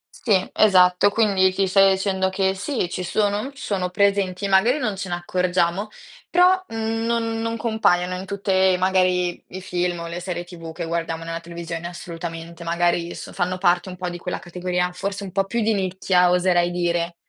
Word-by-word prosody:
Sì, 195 -6 +1
esatto, 185 -1 +5
quindi 200 -3 +3
ti 195 +1 +1
sto 195 +1 +5
dicendo 190 0 0
che, 190 0 0
sì, 195 +1 -2
ci 180 - -5
sono 205 +3 0
mhmm, 270 - -6
sono 195 -8 -2
presenti, 200 0 +1
magari 195 +8 +4
non 215 -8 -1
ce 190 -1 -5
ne 175 - -1
accorgiamo, 180 +2 0 0.4
però, 365 +1 +4
mhmm, 225 0 -2
non 230 -1 -1
non 230 0 -2
compaiono 185 -6 +1
in 185 +1 -6
tutte, 190 -2 +2
magari, 180 -1 +1
i 185 - -8
film 180 -2 -2
o 170 - -5
le 170 +1 -5
serie 175 -1 -4
TV 170 -2 -9
che 170 +1 -5
guardiamo 165 0 -3
nella 165 0 -4
televisione, 170 0 -6
assolutamente, 170 -1 -7
magari 170 0 0
s - - -9
fanno 185 0 -1
parte 180 0 +2
un 180 - -7
po' 180 0 -3
di 175 0 -7
quella 180 +1 -4
categoria, 180 +1 -2
forse 200 +2 -4
un 195 - -7
po' 195 +1 0
più 235 +4 -2
di 220 +1 +2
nicchia, 185 -2 +2
oserei 175 -1 +3
dire. 175 -1 -1
185 Hz, 185 wpm, -22 LUFS, 175-200 Hz, 0.4 s, esatto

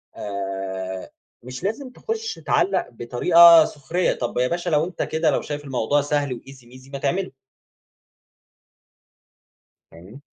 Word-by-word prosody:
آآ، 95 -2 -5 0.3
مش 125 +1 -8
لازم 225 +7 -3
تُخش 450 - -4
تعلق 380 - 0
بطريقة 165 +8 +6
سخرية، 165 +5 -1
طَب 120 - -4
يا 125 +1 +2
باشا 175 +4 -2
لو 155 -1 +2
أنت 175 -1 -6
كده 160 +1 0
لو - - 0
شايف 145 0 -6
الموضوع 135 +2 0
سهل 145 0 -1
وEasy 135 0 -15
ميزي 130 +2 -15
ما 140 - -6
تعمله. 185 +7 -2 2.6
فاهمني؟ 90 +11 -14
140 Hz, 130 wpm, -22 LUFS, 120-170 Hz, 2.6 s, بطريقة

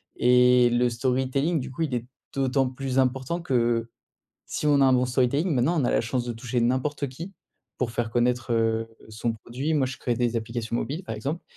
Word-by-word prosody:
et 125 0 +5
le 120 0 +2
storytelling 130 +6 0
du 130 0 -6
coup 150 - -6
il 140 -5 -2
est 120 0 -3 0.3
d'autant 135 -1 +1
plus 130 0 -4
important 130 +6 0
que, 120 -5 +1 0.6
si - - -3
on 145 -1 +4
a 135 - +6
un 130 - +5
bon 125 0 +3
storytelling 135 +7 +1
maintenant 145 +7 +2
on - - +1
a - - +1
la - - +3
chance 120 +2 -2
de 120 - -2
toucher 120 +1 -2
n'importe 130 +4 0
qui 170 +9 -8 0.4
pour 120 -3 -1
faire 115 -1 -2
connaître, 120 +1 0
heu, 115 0 +1 0.2
son 110 +1 -2
produit. 125 +8 -4
Moi 135 -3 +2
je 130 - -5
crée 120 -2 -1
des 120 -1 0
applications 115 +1 -3
mobiles, 155 +9 -3
par 110 - -5
exemple 140 +10 -4
125 Hz, 205 wpm, -26 LUFS, 120-135 Hz, 0.6 s, a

